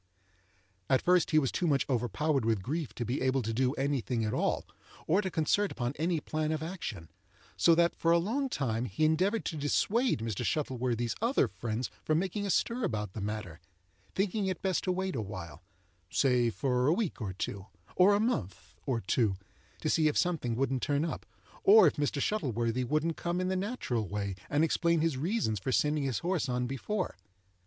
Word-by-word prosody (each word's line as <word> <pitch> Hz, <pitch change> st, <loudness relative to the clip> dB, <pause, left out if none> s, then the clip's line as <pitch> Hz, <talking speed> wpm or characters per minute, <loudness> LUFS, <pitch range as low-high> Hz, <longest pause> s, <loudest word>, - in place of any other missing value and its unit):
At 130 Hz, -, +3 dB
first 180 Hz, -1 st, +4 dB
he 155 Hz, -, +3 dB
was 135 Hz, -4 st, +3 dB
too 175 Hz, -, 0 dB
much 140 Hz, -3 st, +2 dB
overpowered 135 Hz, +3 st, 0 dB
with 110 Hz, -4 st, 0 dB
grief 150 Hz, -, -3 dB
to 120 Hz, -, -3 dB
be 120 Hz, +5 st, -2 dB
able 130 Hz, 0 st, +1 dB
to 115 Hz, +1 st, -2 dB
do 130 Hz, +3 st, +1 dB
any 140 Hz, -1 st, 0 dB
thing 115 Hz, -2 st, -1 dB
at 105 Hz, -, -1 dB
all, -, -, 0 dB, 0.4 s
or 185 Hz, +6 st, +3 dB
to 190 Hz, -, -2 dB
concert 185 Hz, +5 st, +1 dB
upon 120 Hz, +1 st, -2 dB
any 165 Hz, +1 st, 0 dB
plan 155 Hz, +1 st, -2 dB
of 155 Hz, -1 st, -2 dB
action; 115 Hz, -, -6 dB, 0.4 s
so 165 Hz, -, +5 dB
that 170 Hz, +1 st, +3 dB
for 165 Hz, -, 0 dB
a 170 Hz, -, +6 dB
long 245 Hz, +11 st, -1 dB
time 120 Hz, -, -1 dB
he 120 Hz, +7 st, 0 dB
endeavored 185 Hz, +8 st, +1 dB
to 165 Hz, -, -2 dB
dissuade 220 Hz, -, +1 dB
Mr. 110 Hz, -4 st, -3 dB
Shuttleworthy's 125 Hz, -5 st, -1 dB
other 240 Hz, +4 st, +3 dB
friends 115 Hz, +1 st, -4 dB
from 155 Hz, -, +2 dB
making 195 Hz, +3 st, -1 dB
a -, -, -3 dB
stir 235 Hz, +7 st, +1 dB
about 105 Hz, -, -2 dB
the 110 Hz, -, -5 dB
matter, 100 Hz, -5 st, -4 dB, 0.6 s
thinking 195 Hz, +1 st, 0 dB
it 185 Hz, -2 st, -3 dB
best 190 Hz, -3 st, 0 dB
to 185 Hz, -, +1 dB
wait 190 Hz, +1 st, -2 dB
awhile—say 90 Hz, -, -2 dB
for 125 Hz, +1 st, 0 dB
a 155 Hz, -, +5 dB
week 190 Hz, -, -2 dB
or 95 Hz, -4 st, -3 dB
two, 95 Hz, +1 st, -5 dB, 0.3 s
or 195 Hz, +3 st, +6 dB
a -, -, +2 dB
month, 100 Hz, -, -2 dB
or 120 Hz, -4 st, 0 dB
two—to 100 Hz, -6 st, -2 dB
see 155 Hz, -1 st, +3 dB
if 150 Hz, -, +1 dB
something 160 Hz, -10 st, 0 dB
wouldn't 135 Hz, 0 st, 0 dB
turn 145 Hz, +1 st, +1 dB
up, -, -, -5 dB, 0.4 s
or 415 Hz, +3 st, +8 dB
if -, -, +2 dB
Mr. 145 Hz, 0 st, 0 dB
Shuttleworthy 125 Hz, -, 0 dB
wouldn't 155 Hz, +5 st, 0 dB
come 175 Hz, +1 st, -2 dB
in 185 Hz, 0 st, 0 dB
the 190 Hz, -, 0 dB
natural 185 Hz, -, -2 dB
way, 100 Hz, +1 st, -3 dB, 0.2 s
and 145 Hz, +2 st, +2 dB
explain 170 Hz, 0 st, +2 dB
his 165 Hz, -3 st, +1 dB
reasons 150 Hz, -, -1 dB
for 130 Hz, -, -2 dB
sending 150 Hz, +2 st, +1 dB
his 130 Hz, -4 st, -1 dB
horse 175 Hz, -7 st, 0 dB
on 125 Hz, 0 st, 0 dB
before. 160 Hz, -, -3 dB
140 Hz, 195 wpm, -31 LUFS, 115-175 Hz, 0.6 s, or